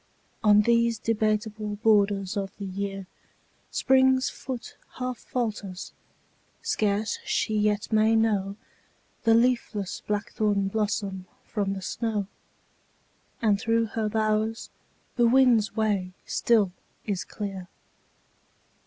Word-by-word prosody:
On 210 -1 +6
these 235 0 +3
debateable* 215 -1 -1
borders 205 -2 +2
of 195 -1 -4
the 200 - -5
year 195 0 -4 0.6
Spring's 260 0 +3
foot 250 -5 -7 0.2
half 250 -1 -3
falters; 210 -7 -4 0.7
scarce 210 0 0
she 215 - 0
yet 210 +1 0
may 220 +1 +4
know 205 -3 +1 0.7
The 225 0 +6
leafless 230 -5 +1
blackthorn 205 -1 0
blossom 200 -3 -2 0.2
from 200 -3 -2
the 190 -1 -6
snow; 215 -1 -2 1.2
And 205 -2 +3
through 230 0 +2
her 220 -2 0
bowers 215 +1 0 0.5
the 240 -1 +5
wind's 240 -4 +4
way 200 -4 0
still 215 -6 +2 0.3
is 200 -4 -2
clear. 195 -3 -6
215 Hz, 105 wpm, -26 LUFS, 200-225 Hz, 1.2 s, On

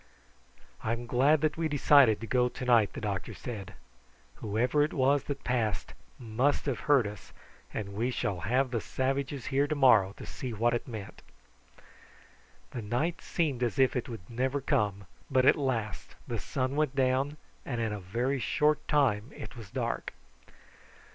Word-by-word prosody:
"I'm 115 +2 -2
glad 140 +5 +3
that 155 0 0
we 165 -1 0
decided 140 -6 +5
to - - -4
go 125 +2 +2
to 125 - -7
night," 115 -4 +4
the - - -6
doctor 100 -3 -3
said. 105 -5 -7 0.6
"Whoever 120 +7 +1
it 150 - +1
was 140 +1 +2
that 140 -1 -5
passed 115 -6 -1 0.2
must 120 +5 0
have 135 -4 -1
heard 140 -5 +6
us, 105 -1 -8 0.4
and 100 -2 -5
we 115 +5 0
shall 100 -6 -2
have 125 +8 +1
the 115 -3 -1
savages 135 +1 -2
here 140 +2 +3
to 155 - -1
morrow 115 -9 +5
to - - -8
see 125 -3 -6
what 115 +2 +1
it 120 - -2
meant." 110 -5 -8 1.5
The 120 - -5
night 125 +11 -1
seemed 145 -8 -1
as 120 +1 0
if 130 -1 +4
it 125 - -2
would 110 -7 -8
never 130 +4 -1
come, 105 -8 0 0.2
but 130 -2 +3
at - - +7
last 115 -8 -3
the - - -3
sun 130 +1 -2
went 150 -3 0
down, 135 +2 +1 0.3
and 120 -4 -3
in 110 -2 -1
a 105 - -4
very 120 +9 -1
short 150 +3 +1
time 130 -6 +2
it - - -9
was 115 -5 -10
dark. - - -3
125 Hz, 170 wpm, -30 LUFS, 110-140 Hz, 1.5 s, at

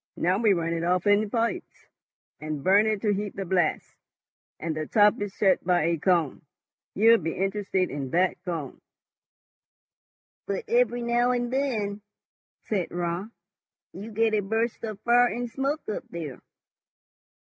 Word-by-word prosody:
Now 180 +3 +1
we 220 -3 +4
run 170 -2 -1
it 165 0 -2
off 180 +1 +1
in 205 +1 +3
pipes, 230 +1 -3 0.5
and 155 -2 -5
burn 200 +5 +4
it 215 -2 -1
to 210 -2 +2
heat 205 0 -4
the 195 - -4
blast, 175 -3 0 0.7
and 160 -1 -3
the 155 -1 -4
top 210 -1 +4
is 205 -1 -3
shut 190 -1 +2
by 175 -2 +2
a 165 0 0
cone. 170 -4 +1 0.5
You'll 225 +3 +6
be 165 -1 -4
interested 195 -1 -1
in 140 -2 -4
that 180 +3 +1
cone." 165 -7 -5 1.7
"But 200 -1 -2
every 240 0 +2
now 240 +1 +2
and 245 0 -2
then," 215 -7 -1 0.6
said 195 -5 -2
Raut, 175 +3 -3 0.6
"you 205 +4 -8
get 225 +1 +1
a 215 - +3
burst 225 +4 -2
of 215 -3 -5
fire 245 +1 +4
and 245 +1 -3
smoke 275 +5 -3
up 215 - -3
there." 160 -6 -6
200 Hz, 155 wpm, -26 LUFS, 175-225 Hz, 1.7 s, You'll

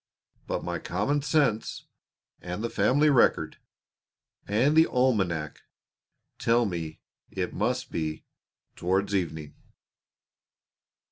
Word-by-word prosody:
But - - -2
my - - -3
common 135 +11 -1
sense, 140 -7 0 0.6
and 90 +4 -5
the 115 - -2
family 140 +9 +3
record, 130 - +3 0.9
and 120 +9 +2
the 160 +1 +6
almanac 95 - 0 0.8
tell 120 +1 +3
me 85 -5 -5 0.3
it - - -3
must - - -1
be 80 -1 -3 0.5
"towards 95 +3 0
evening." 80 -6 -2
105 Hz, 95 wpm, -27 LUFS, 85-130 Hz, 0.9 s, the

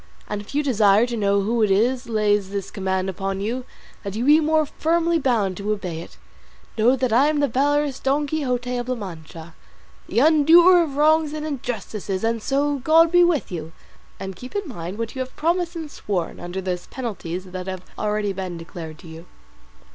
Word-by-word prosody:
And 210 -1 -3
if 210 - -11
you 295 - +2
desire 215 -5 +4
to 240 -1 -4
know 200 -2 +2
who 225 +3 0
it 215 - +3
is 240 +5 +1
lays 210 -3 +1
this 200 -1 -4
command 190 -1 -1
upon 195 +1 -3
you, 240 +5 -3 0.4
that 200 -1 -6
you 235 +3 -1
be 300 +2 +6
more 315 0 +2
firmly 335 +3 +1
bound 220 - 0
to 205 +1 -2
obey 180 -6 -5
it, - - -12 0.6
know 230 +4 +4
that 255 -3 -1
I 265 +5 +5
am 305 -1 +1
the 285 - +3
valorous 285 +2 +1
Don 280 +2 +1
Quixote 250 -4 -2
of 245 +1 -4
La 255 - 0
Mancha, 165 -5 -9 0.6
the 205 - -4
undoer 325 +6 +6
of 285 -4 -5
wrongs 310 0 +3
and 305 0 -4
injustices; 220 -8 -4
and 230 0 0
so, 285 +3 0
God 325 +4 +5
be 355 0 +6
with 340 - +1
you, 160 -2 -6 0.5
and 190 -1 -6
keep 250 - -11
in 405 -3 -2
mind 185 - -6
what 230 -1 -4
you 260 - -7
have 260 0 -5
promised 345 +2 0
and 320 -3 -6
sworn 185 -10 -3
under 175 +2 -5
those 180 -1 -4
penalties 190 -8 -5
that 185 0 -7
have 185 -1 -5
been - - -25
already 210 -1 -1
declared 170 -3 -7
to 170 - -14
you." 165 +2 -11
230 Hz, 200 wpm, -22 LUFS, 190-290 Hz, 0.6 s, be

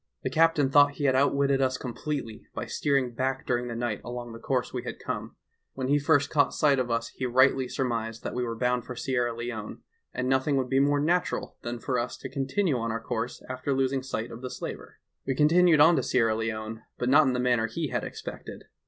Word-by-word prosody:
The - - -2
captain 160 -4 +3
thought 145 0 +6
he 145 - -6
bad 130 - +4
outwitted 140 0 +2
us 130 -1 +1
completely 125 -2 -5
by - - -3
steering 135 -4 0
back 130 +2 -2
during 125 0 0
the 120 - -5
night 115 -3 -2
along 120 -1 -6
the 115 - -9
course 130 +1 -1
we 125 - -2
had 125 - -6
come; - - -5 0.4
when 130 -1 -3
he 145 +1 +4
first 145 0 +2
caught 145 -2 +2
sight 145 -3 +3
of 125 -1 -1
us 115 0 -1
he 130 - -4
rightly 130 +1 +4
sur 130 +1 -2
mised 115 -2 -3
that - - -4
we 125 - -1
were 115 -1 -3
bound 125 0 +1
for 125 +1 -7
Sierra 125 -1 0
Leone 115 -2 -6 0.3
and 125 - -2
nothing 135 +2 +2
would 130 -1 -1
be 135 - +3
more 145 +1 +3
natural 175 +4 0
than 120 0 -4
for 125 +1 -1
us 120 +1 -3
to 135 - -7
continue 135 +3 0
on 115 0 -2
our 115 - -2
course 115 +1 -4
after 130 +2 -2
losing 135 0 +1
sight 120 -3 -4
of 115 - -9
the 130 - -5
slaver. - - -7 0.3
"We 135 - 0
continued 165 +2 +5
on 165 +3 +7
to - - +2
Sierra 115 -3 +2
Leone, 110 0 -4 0.2
but 125 - -2
not 145 +2 +6
in 130 - +1
the 125 - -1
manner 120 -2 +2
he 155 +6 -3
had - - -2
expected. - - -8
130 Hz, 230 wpm, -27 LUFS, 120-140 Hz, 0.4 s, on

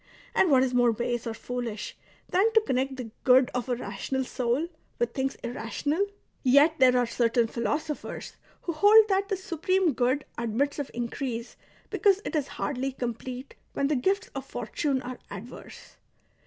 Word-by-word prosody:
And 375 - +4
what 260 -3 +5
is 255 -1 0
more 245 -1 +4
base 240 +1 -2
or 225 - -3
foolish 235 -3 -5 0.3
than 395 +5 +3
to 445 - +6
connect 265 -6 -1
the 245 -4 -7
good 255 0 +5
of 250 +1 -2
a 245 - +2
rational 265 +2 -3
soul 250 +5 -1 0.3
with 240 -1 0
things 270 0 -1
irrational? 245 - -1 0.4
Yet 290 +5 +5
there 255 -1 +6
are 245 - +3
certain 235 0 +2
philosophers 295 +7 -3 0.3
who 345 - -1
hold 420 +6 +7
that 390 0 +1
the 390 - 0
Supreme 365 -1 +1
Good 255 +4 +1
admits 240 +6 0
of 285 - -3
increase 235 0 -4 0.4
because 400 -2 +3
it - - -3
is 290 -3 0
hardly 265 0 -3
complete 250 +1 -5 0.2
when 280 0 0
the 300 - +2
gifts 385 - 0
of - - -4
fortune 275 -4 -2
are 250 0 -6
adverse." 210 +5 -10
260 Hz, 165 wpm, -27 LUFS, 245-305 Hz, 0.4 s, hold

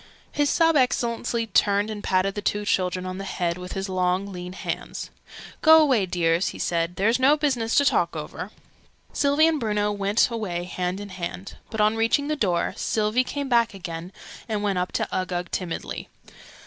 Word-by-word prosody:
His 290 -1 +1
Sub 330 -1 +3
Excellency 235 -3 +1
turned 205 0 +2
and 210 -1 -6
patted 190 +1 +1
the 205 - -4
two 205 0 -1
children 185 -2 0
on 185 +1 -5
the - - -4
head 175 -2 -2
with 180 0 -7
his 195 +1 -3
long 185 +1 0
lean 180 0 -7
hands. - - -5 0.5
"Go 320 0 +8
away, 260 -11 +3
dears!" 170 0 +1
he - - -5
said. 170 0 -1
"There's 220 +7 +2 0.2
business 245 -6 0
to 285 - +5
talk - - +2
over." - - -6 0.6
Sylvie 285 +2 +3
and 320 -2 +2
Bruno 210 -3 0
went 205 +3 +1
away 190 -7 -3
hand 180 +1 -3
in 205 0 -7
hand: 185 +1 -6
but, 220 - -5
on 215 +1 +3
reaching 230 +6 +1
the 305 - +1
door, 180 - 0
Sylvie 215 +3 +1
came 285 +2 -4
back 235 -4 +2
again 175 -1 -6 0.4
and 210 -1 -1
went 195 -3 0
up 180 - -2
to - - 0
Uggug 180 -1 -2
timidly. 180 -3 -4
205 Hz, 180 wpm, -24 LUFS, 180-235 Hz, 0.6 s, Go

